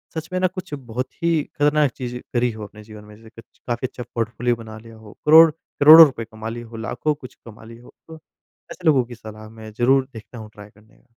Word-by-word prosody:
सच 160 0 -5
में 185 - 0
ना 185 - +2
कुछ 185 -3 -9
बहुत 125 -2 -5 0.2
ही 165 -3 +1
खतरनाक 150 -2 +1
चीज़ 125 -1 -7 0.2
करी 120 -1 +1
हो 110 -1 -9
अपने 105 +1 -14
जीवन 105 -1 -13
में। 105 0 -15
जैसे 110 +1 -17
कच - - -35
काफ़ी 120 +2 -2
अच्छा 120 - -9
पोर्टफोलियो 115 +1 -1
बना 110 -1 -11
लिया 115 0 -15
हो, 110 -2 -15
करोड़ 160 +2 +8
करोड़ों 160 +1 +7
रुपए 125 -6 -5
कमा 110 0 -8
लिए 120 +1 -7
हो, 115 0 -13
लाखों 120 +6 -2
कुछ 130 -4 -13
कमा 110 -1 -13
लिए 115 +1 -13
हो - - -18
तो 160 - -11 0.6
ऐसे 180 - -11
लोगों 135 -5 +4
की 120 0 -11
सलाह 110 -1 -12
मैं 110 0 -12
ज़रूर 130 +2 +2
देखता 115 +2 -12
हूँ, 110 -1 -10
ट्राई 105 0 -13
करने 105 +1 -25
की। - - -30
120 Hz, 235 wpm, -21 LUFS, 110-145 Hz, 0.6 s, करोड़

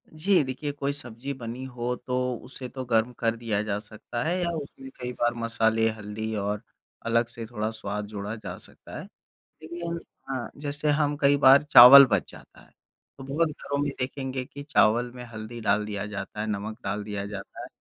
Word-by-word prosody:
जी, 175 +2 +2
देखिए 135 +3 -4
कोई 140 0 -2
सब्ज़ी 130 0 -6
बनी 120 0 -7
हो 125 -1 -3
तो 125 +1 -4 0.3
उसे 130 0 -8
तो 130 +1 -6
गर्म 115 0 +2
कर 115 -1 +1
दिया 115 -3 -1
जा 105 -2 -2
सकता 110 +3 -6
है 175 +3 0
या 175 - 0
उसमें 140 -2 -8
कई 125 0 -3
बार 120 0 +2
मसाले 115 -1 +2
हल्दी 110 0 -5
और 105 0 -2 0.4
अलग 115 +1 +2
से 115 -1 -7
थोड़ा 110 -1 -3
स्वाद 105 -2 -4
जोड़ा 105 +1 -5
जा 110 - -7
सकता - - -11
है। - - -7 0.6
लेकिन 170 +1 -5 0.4
अ, 130 -2 -4
जैसे 145 +1 -3
हम 145 0 +2
कई 140 0 +5
बार 140 0 +7
चावल 140 -1 +11
बच 120 - 0
जाता - - -15
है, - - -21 0.5
तो 135 - -8
बहुत 150 +5 +1
घरों 140 -1 -4
में 145 - 0
देखेंगे 130 0 -3
कि 140 +2 -10
चावल 120 -5 +3
में 125 -1 -8
हल्दी 110 +2 -7
डाल 105 -1 +2
दिया 100 -1 -4
जाता 105 0 -6
है, 110 - -1
नमक 110 +1 -4
डाल 105 +2 -2
दिया 100 -1 -4
जाता 100 -1 -8
है - - -7
120 Hz, 195 wpm, -26 LUFS, 110-140 Hz, 0.6 s, चावल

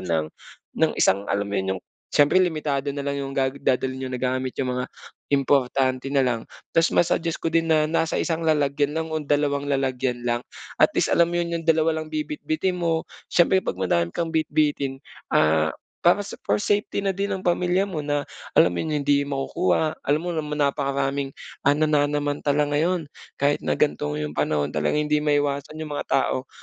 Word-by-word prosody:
ng 80 -3 -1 0.5
ng - - +4
isang 100 +2 +2
alam 100 0 0
mo 100 - -7
'yun, 95 - -4
'yung - - -9 0.3
siyempre 145 +6 +4
limitado 150 -5 -1
nalang 140 0 -3
'yung 135 - -4
ga 135 -1 +1
dadalhin 130 -1 -1
niyo 130 - -3
na 125 - -3
gamit, 130 +1 -1
'yung 125 -2 -1
mga 125 - -3 0.4
importante 135 -1 +1
nalang. 125 -5 +1 0.3
Tapos 165 0 +4
ma-suggest 165 -1 +1
ko - - -4
din 165 0 +2
na 155 -1 +4
nasa 165 0 0
isang 165 -1 -1
lalagyan 150 -1 +1
lang 160 0 -3
o 155 - -1
dalawang 145 -1 0
lalagyan 130 -2 0
lang. 120 0 0 0.4
At - - +6
least - - +3
alam 170 0 +4
mo 175 - -1
'yun 170 0 -1
'yung 165 -1 -3
dalawa 160 0 +2
lang 155 - -11
bibitbitin 305 - -2
mo. 165 -1 0 0.2
Siyempre 185 +2 +4
'pag 90 - -4
madami 85 -2 +1
kang 165 - -3
bitbitin 145 -4 0 0.3
ah, 80 0 +3 0.3
para 190 +4 +3
sa - - -9
for - - +4
safety 205 -1 0
na 195 - +2
din 200 +2 -2
ang 190 -2 -4
pamilya 180 +2 +2
mo 185 -6 -4
na 145 -1 -1 0.3
alam 90 - +6
'yung 160 - -2 0.2
hindi 140 0 +3
makukuha, 140 - 0
alam 145 +2 +1
mo 180 - -2
naman 150 -2 -3
napakaraming 140 0 -1 0.3
ah, 145 +1 +3
nananamantala 145 -1 +1
ngayon 165 +3 +1 0.3
kahit 145 +1 +1
na 75 -1 -1
ganito 75 0 +1
'yung 75 0 -3
panahon, 75 -1 0
talagang 75 - 0
hindi 150 0 +1
maiwasan 145 0 0
iyung 155 -1 -6
mga 145 - -3
tao 135 -1 0
145 Hz, 185 wpm, -24 LUFS, 130-160 Hz, 0.5 s, At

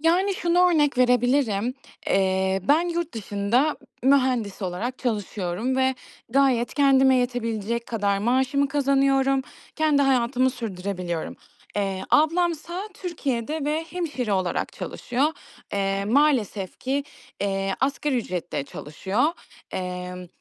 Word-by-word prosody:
Yani 360 +5 +2
şunu 355 0 +3
örnek 295 -5 +2
verebilirim. 245 -2 +2 0.3
Eee, 190 0 +2
ben 330 +4 +4
yurt 340 -1 -2
dışında 220 +7 0 0.3
ı - - +1
mühendis 255 -7 +2
olarak 195 +8 -3
çalışıyorum 215 0 -2
ve 265 0 +2 0.3
gayet 255 -2 +2
kendime 270 -2 +5
yetebilecek 235 -2 -1
kadar 200 -3 0
maaşımı 260 +5 +1
kazanıyorum. 275 -1 +2 0.3
Kendi 305 -3 +3
hayatımı 255 -1 +2
sürdürebiliyorum. 185 -7 -4 0.4
Eee, 195 -2 -1
ablamsa 345 +4 +1
Türkiye'de 305 - -3
ve 305 +2 -1
hemşire 295 - -2
olarak 185 -2 -1
çalışıyor. 270 +6 -1 0.4
Eee, 195 0 0
maalesef 225 - +1
ki, 275 +2 -1 0.4
eee, 195 -1 0
asgari 275 +1 0
ücretle 180 -9 -3
çalışıyor, 190 - -2 0.5
emm, 180 0 -5
250 Hz, 110 wpm, -24 LUFS, 200-280 Hz, 0.5 s, kendime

